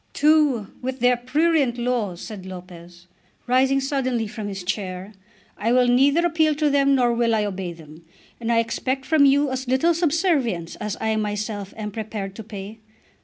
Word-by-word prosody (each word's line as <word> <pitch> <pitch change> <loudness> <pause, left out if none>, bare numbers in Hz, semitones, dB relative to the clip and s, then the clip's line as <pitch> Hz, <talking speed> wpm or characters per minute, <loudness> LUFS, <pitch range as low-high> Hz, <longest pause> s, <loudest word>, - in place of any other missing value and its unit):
"To 300 -5 +3
h 200 - -11
with 260 +1 -4
their 245 +1 +4
prurient 275 +1 +1
laws," 235 -7 -2
said 210 -4 -8
Lopez, 175 -1 -11 0.4
rising 265 +2 +3
suddenly 265 -4 -1
from 210 0 -6
his 195 -2 -5
chair. 190 0 -4 0.5
"I 225 +3 0
will 250 0 +4
neither 280 +7 +4
appeal 315 -3 +2
to 300 -1 +1
them 275 0 +3
nor 245 -2 +2
will 235 -1 +2
I 210 -1 +1
obey 190 -3 -4
them. 160 -1 -13 0.4
And 235 0 -2
I 230 - +3
expect 260 +4 -1
from 295 0 +4
you 280 0 +3
as 260 0 -4
little 265 +7 +3
subservience 300 - 0
as 210 -1 -4
I 220 0 0
myself 210 -1 -3
am 210 -1 -5
prepared 210 -2 -5
to 220 - -7
pay. 210 0 -9
235 Hz, 175 wpm, -23 LUFS, 205-275 Hz, 0.5 s, their